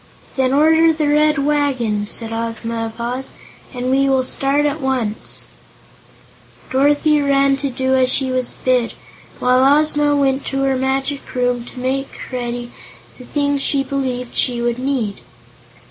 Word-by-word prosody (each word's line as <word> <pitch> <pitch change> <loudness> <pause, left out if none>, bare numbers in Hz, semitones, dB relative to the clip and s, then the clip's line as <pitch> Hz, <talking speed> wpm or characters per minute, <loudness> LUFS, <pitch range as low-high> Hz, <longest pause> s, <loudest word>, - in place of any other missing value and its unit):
"Then 260 -2 +1
order 320 +3 +5
the 310 -1 -1
Red 300 +1 +3
Wagon," 275 -8 0
said 225 +1 +2
Ozma 230 0 -3
of 225 +1 -12
Oz, 250 +3 -4 0.4
"and 250 0 -3
we 275 +1 +3
will 265 -1 +2
start 275 +3 +1
at 295 +1 -1
once." 255 -5 -2 1.3
Dorothy 290 +3 +3
ran 275 -1 +3
to 280 0 -2
do 260 +1 -1
as 260 -1 +3
she 265 -1 0
was 255 -1 -2
bid, 250 -2 +2 0.4
while 260 +3 +4
Ozma 295 -1 +2
went 275 -1 +1
to 270 0 -2
her 270 -1 +1
Magic 270 +2 -1
Room 245 -1 0
to 250 - -10
make 265 +2 -3
ready 240 -1 -4 0.5
the 250 - -11
things 285 0 -1
she 275 0 +1
believed 255 -3 -3
she 245 -2 0
would 240 0 -1
need. 255 -7 -2
265 Hz, 150 wpm, -18 LUFS, 245-280 Hz, 1.3 s, order